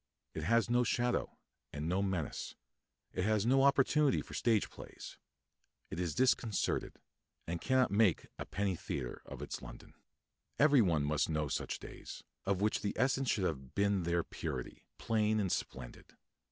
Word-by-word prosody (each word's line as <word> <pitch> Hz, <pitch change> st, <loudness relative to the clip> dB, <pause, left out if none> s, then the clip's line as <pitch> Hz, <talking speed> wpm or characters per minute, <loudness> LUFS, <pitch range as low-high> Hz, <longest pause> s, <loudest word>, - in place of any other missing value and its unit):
It 80 Hz, -, -4 dB
has 115 Hz, +4 st, +3 dB
no 120 Hz, +1 st, +3 dB
shadow 120 Hz, +1 st, 0 dB, 0.3 s
and 75 Hz, +1 st, -4 dB
no 90 Hz, +3 st, +1 dB
menace; 95 Hz, -7 st, -2 dB, 0.6 s
it 90 Hz, -, -1 dB
has 110 Hz, 0 st, +2 dB
no 135 Hz, +3 st, +4 dB
opportunity 140 Hz, +1 st, +4 dB
for -, -, -12 dB
stage 115 Hz, -4 st, +2 dB
plays; -, -, -10 dB, 0.7 s
it 80 Hz, -, -4 dB
is 85 Hz, -4 st, -1 dB
disconcerted, 125 Hz, -4 st, +1 dB, 0.5 s
and 85 Hz, 0 st, -3 dB
cannot 130 Hz, -4 st, +3 dB
make 100 Hz, -4 st, +3 dB
a -, -, -5 dB
penny 100 Hz, -2 st, -1 dB
theatre 65 Hz, -6 st, -5 dB
of -, -, -7 dB
its -, -, -5 dB
London. -, -, -11 dB, 0.6 s
Every 145 Hz, -3 st, +6 dB
one 85 Hz, -8 st, +2 dB
must 75 Hz, +1 st, +1 dB
know 75 Hz, -2 st, 0 dB
such -, -, -2 dB
days, -, -, -9 dB, 0.2 s
of 100 Hz, -1 st, +1 dB
which 105 Hz, +1 st, +1 dB
the 100 Hz, -, -2 dB
essence 130 Hz, +1 st, +2 dB
should 100 Hz, -, +1 dB
have 65 Hz, -4 st, -4 dB
been 100 Hz, -1 st, +2 dB
their 85 Hz, 0 st, +1 dB
purity, -, -, -6 dB
plain 110 Hz, -1 st, +1 dB
and 95 Hz, -4 st, 0 dB
splendid. 65 Hz, -2 st, -4 dB
100 Hz, 160 wpm, -34 LUFS, 85-120 Hz, 0.7 s, Every